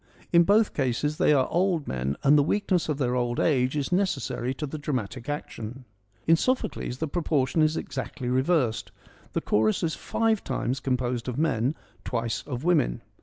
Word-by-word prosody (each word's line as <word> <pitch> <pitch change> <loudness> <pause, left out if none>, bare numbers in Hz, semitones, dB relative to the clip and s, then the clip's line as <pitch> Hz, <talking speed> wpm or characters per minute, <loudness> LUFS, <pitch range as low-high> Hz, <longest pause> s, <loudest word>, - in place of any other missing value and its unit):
In 170 0 +7
both 210 +3 +4
cases 145 +3 0
they - - +4
are 135 -3 +3
old 175 -4 +1
men, 65 +2 -2
and 140 +2 +6
the 145 - +6
weakness 180 +2 +1
of 150 - 0
their 125 -3 0
old 120 -1 0
age 130 -2 +2
is 145 +2 -2
necessary 175 -9 0
to 150 - -3
the 150 +2 -6
dramatic 130 -3 -3
action. 130 -3 -6 0.4
In 165 - +6
Sophocles 250 - -1
the 160 - -2
proportion 150 -3 0
is 155 +1 +2
exactly 130 -4 -5
reversed. 130 -2 +1 0.4
The - - 0
chorus 110 +6 +1
is 160 -2 0
five 225 -2 0
times 130 0 -2
composed 125 -2 -1
of 125 -1 -3
men, 140 -3 +1 0.3
twice 115 -2 -2
of 130 -2 -4
women. 160 - +2
135 Hz, 170 wpm, -26 LUFS, 125-160 Hz, 0.4 s, In